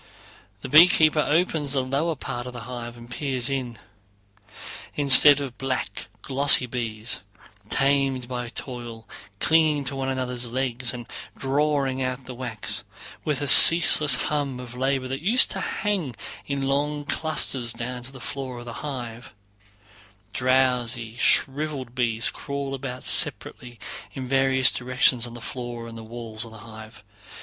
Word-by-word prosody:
The - - -7
beekeeper 155 +1 +5
opens 155 -3 0
the 135 -2 0
lower 145 +6 -2
part 125 -2 -6
of 125 - -9
the 120 - -8
hive 120 -1 -8
and 120 0 -13
peers 130 0 -3
in. 125 -4 -4 1.2
Instead 145 0 +8
of 135 -4 -7
black, 135 -1 -4 0.2
glossy 140 -1 +4
bees—tamed 120 +3 -3
by 125 -1 -5
toil, 120 -3 -9 0.3
clinging 155 -3 +2
to 135 +1 -5
one 135 0 -3
another's 125 -2 -3
legs 125 0 -3
and 120 -2 -9 0.3
drawing 135 -1 -1
out 130 0 -4
the 130 - -9
wax, 120 -4 -5 0.4
with 150 -3 -2
a - - -3
ceaseless 155 -2 +9
hum 140 -1 -3
of 125 -1 -10
labor—that 135 +1 -3
used 225 +9 +3
to - - -4
hang 185 - -3 0.3
in 140 -1 -3
long 145 +2 -2
clusters 140 -6 -1
down 125 +2 -6
to 125 +2 -11
the 135 - -13
floor 130 +1 -7
of 120 - -10
the 120 - -8
hive, 120 -6 -8 1.0
drowsy 125 -3 0
shriveled 135 -3 +1
bees 120 -3 0
crawl 140 -1 -6
about 130 -1 -6
separately 120 -2 0 0.3
in 130 -2 -7
various 135 -1 +2
directions 125 -1 +1
on 120 - -11
the - - -9
floor 120 -1 -7
and 115 0 -10
walls 115 -2 -6
of 115 - -10
the 110 - -13
hive. 110 -1 -13
130 Hz, 140 wpm, -23 LUFS, 120-140 Hz, 1.2 s, ceaseless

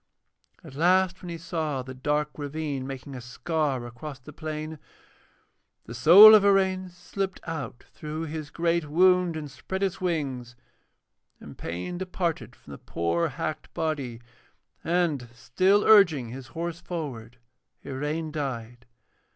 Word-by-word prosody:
At 155 -5 -12
last 185 +4 +2
when 180 - -8
he 170 - -5
saw 160 -5 -3
the 130 0 -8
dark 150 +3 -1
ravine 145 -2 -4
making 135 0 -7
a 125 - -7
scar 135 0 -2
across 130 +4 -8
the 135 +4 -13
plain, 155 0 -6 1.1
the 115 - -8
soul 180 - +10
of 215 -2 +7
Iraine 190 -2 +2
slipped 185 +2 -5
out 155 -7 -6
through 155 +1 -5
his 155 -1 -5
great 170 -1 0
wound 180 +1 +4
and 150 -3 -6
spread 190 +9 -5
its 190 -1 -2
wings, 135 -9 -2 0.8
and - - -11
pain 90 - -5
departed 170 - -3
from - - -16
the 70 - -9
poor 85 0 -1
hacked - - -5
body, 140 -7 -2 0.6
and, 160 -8 0
still 185 - +2
urging 170 - +5
his 130 +1 -8
horse 170 +5 -5
forward, 125 -9 -6 0.5
Iraine 150 +4 -3
died. 125 -5 -5
155 Hz, 135 wpm, -26 LUFS, 130-175 Hz, 1.1 s, soul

